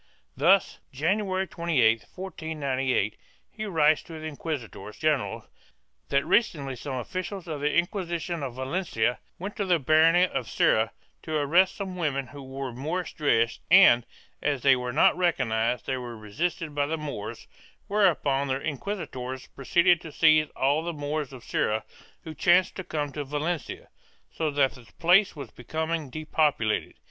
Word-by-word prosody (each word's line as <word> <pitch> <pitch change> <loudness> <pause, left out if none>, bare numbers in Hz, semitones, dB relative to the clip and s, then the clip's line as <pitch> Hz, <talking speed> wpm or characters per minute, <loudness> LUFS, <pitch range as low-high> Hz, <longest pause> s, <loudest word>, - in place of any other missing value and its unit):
Thus 190 +1 +3
January 190 +6 0
28, 140 -11 +1
1498, 140 - -2 0.3
he 215 - -5
writes 155 -5 +3
to 165 - -12
the 155 - -8
inquisitors 135 -9 -6
general 155 -4 0 0.6
that 140 - +2
recently 140 - +1
some 130 +2 -5
officials 185 - -5
of 155 -3 -4
the 150 +1 +1
Inquisition 175 -2 -1
of 130 -4 -5
Valencia 130 -4 -1 0.2
went 195 +4 -6
to 200 - -1
the 180 -2 +3
barony 160 +4 +5
of 120 -9 -4
Serra 110 +1 +2 0.3
to 155 - -4
arrest 170 +6 +3
some 190 -2 -5
women 140 -5 -1
who 145 - -10
wore 135 -1 -6
Moorish 160 +9 -3
dress 115 -6 +1
and, 175 -10 +7 0.4
as 145 -4 -1
they 135 -1 +6
were 125 -1 -3
not 145 - +4
recognized, 125 - 0
they 130 - -1
were 120 -2 -7
resisted 150 +9 -3
by 145 0 0
the 160 +2 -2
Moors, 120 -7 -6 0.4
whereupon 155 -9 +2
the 135 0 -1
inquisitors 135 -5 -5
proceeded 170 +5 +3
to 160 - -9
seize 155 0 +4
all 140 +4 +2
the 170 0 -3
Moors 145 -1 -3
of 130 -3 -11
Serra 110 +1 0 0.4
who 160 - -7
chanced 175 +2 +3
to 190 - -5
come 150 -4 -3
to 145 +1 -4
Valencia, 150 +3 -3 0.5
so 160 -1 -1
that 140 -2 +2
the 120 -4 -16
place 180 +4 +4
was 140 -6 -8
becoming 160 +3 -3
depopulated. 150 -6 0
150 Hz, 155 wpm, -27 LUFS, 130-170 Hz, 0.6 s, and